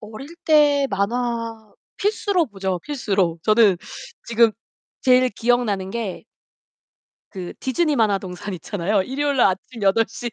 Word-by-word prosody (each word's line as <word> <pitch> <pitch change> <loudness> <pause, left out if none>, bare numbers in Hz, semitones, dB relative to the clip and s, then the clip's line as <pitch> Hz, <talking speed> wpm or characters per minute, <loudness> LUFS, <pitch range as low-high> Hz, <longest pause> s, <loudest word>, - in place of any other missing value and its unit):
어릴 225 +9 -10
때 290 -3 +4
만화 225 +1 -2 0.2
필수로 405 -4 0
보죠, 190 -4 -3
필수로. 195 - -1
저는 215 -3 +4 0.5
지금 230 -1 +3 0.5
제일 255 0 +4
기억나는 215 -4 0
게 220 -4 -4 1.1
그 185 -3 -7
디즈니 300 +4 0
만화동산 195 -3 -1
있잖아요. 190 +3 -1
일요일날 275 +3 +1
아침 200 +4 -4
8:00. 225 +4 +1
225 Hz, 245 characters per minute, -22 LUFS, 195-255 Hz, 1.1 s, 때